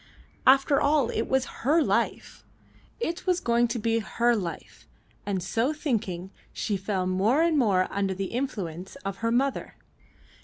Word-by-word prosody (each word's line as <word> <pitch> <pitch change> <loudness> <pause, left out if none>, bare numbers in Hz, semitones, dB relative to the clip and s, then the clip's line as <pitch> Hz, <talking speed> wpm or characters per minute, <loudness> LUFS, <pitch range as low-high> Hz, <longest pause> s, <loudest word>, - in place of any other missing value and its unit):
After 270 +1 +5
all 285 -4 +2
it 225 - -2
was 265 -1 +1 0.2
her 305 +6 +3
life; - - -1 0.6
it 345 -5 -3
was 365 -1 +3
going 240 -3 +2
to 235 +1 -3
be 230 +1 +1
her 235 +2 +1
life, 180 -6 -6 0.4
and 190 -3 -1
so 230 - 0
thinking 200 - -3 0.2
she 210 - -2
fell 190 -1 -2
more 200 - +2
and 335 -2 +2
more 200 -9 +3
under 195 -1 -1
the 195 0 -4
influence 190 -9 -4
of 195 0 -3
her 230 - -1
mother. 265 +3 0
230 Hz, 155 wpm, -27 LUFS, 195-270 Hz, 0.6 s, After